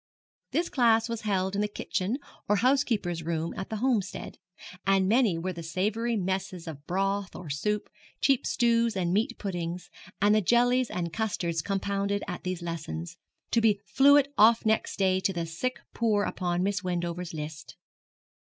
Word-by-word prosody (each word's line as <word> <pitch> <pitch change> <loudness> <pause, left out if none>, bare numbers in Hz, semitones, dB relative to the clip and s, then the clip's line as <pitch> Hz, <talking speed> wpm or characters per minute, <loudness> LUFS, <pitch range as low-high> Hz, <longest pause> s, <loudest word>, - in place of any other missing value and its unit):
This 340 +1 0
class 230 -3 +3
was 230 -2 -4
held 190 -2 0
in 200 - 0
the 210 - +1
kitchen 205 +2 -2 0.3
or 210 - +5
housekeeper's 225 -8 +1
room 165 0 -2
at 190 - -5
the 220 - -3
Homestead; 220 -4 -1 0.5
and 195 -1 +4
many 220 -5 +3
were 185 +3 -3
the 170 - -7
savoury 210 +8 -1
messes 190 -2 -3
of 145 -2 -8
broth 195 +1 -1
or 160 -5 -7
soup, 210 +9 -1 0.3
cheap 270 -3 +2
stews 235 -2 +2
and 175 -1 0
meat 215 +3 0
puddings, 175 -3 -4 0.3
and 205 +2 +4
the 215 - +4
jellies 245 +4 +3
and 170 -2 -3
custards 175 -7 -1
compounded 200 +2 -1
at 180 -2 -5
these 180 -1 -3
lessons, 170 +1 -5 0.3
to 230 - +3
be 215 -3 +3
sent 280 +3 +5
off 225 +2 +6
next 220 0 +1
day 190 -1 +2
to 190 +1 0
the 170 -2 -2
sick 175 +11 -3 0.2
poor 215 -3 +2
upon 175 -2 -1
Miss 195 -1 -1
Wendover's 175 -1 -3
list. 150 0 -7
195 Hz, 165 wpm, -28 LUFS, 175-225 Hz, 0.5 s, off